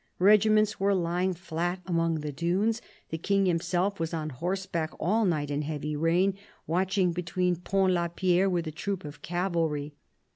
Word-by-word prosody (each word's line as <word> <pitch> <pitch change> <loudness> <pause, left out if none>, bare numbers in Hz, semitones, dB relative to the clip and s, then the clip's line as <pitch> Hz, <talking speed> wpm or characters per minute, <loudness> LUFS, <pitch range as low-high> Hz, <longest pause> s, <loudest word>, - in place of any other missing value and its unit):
Regiments 215 +2 +4
were 200 +1 +3
lying 180 +1 0
flat 175 +1 -3
among 165 -3 0
the 150 0 -4
dunes; 185 - 0 0.3
the 160 - -3
King 195 +3 +2
himself 180 +2 0
was 165 0 -2
on 155 -1 -3
horseback 170 +2 -2
all 215 +7 +2
night 150 -5 0
in 145 +1 0
heavy 150 0 -3
rain, 175 +5 +2 0.3
watching 185 +2 +1
behind 180 0 -1
Pont 190 -1 +2
la 170 -1 +1
Pierre 180 +2 +2
with 175 -2 0
a 155 - -4
troop 185 +2 -4
of 145 +1 -9
cavalry. 165 -5 -1
175 Hz, 160 wpm, -28 LUFS, 165-190 Hz, 0.3 s, Regiments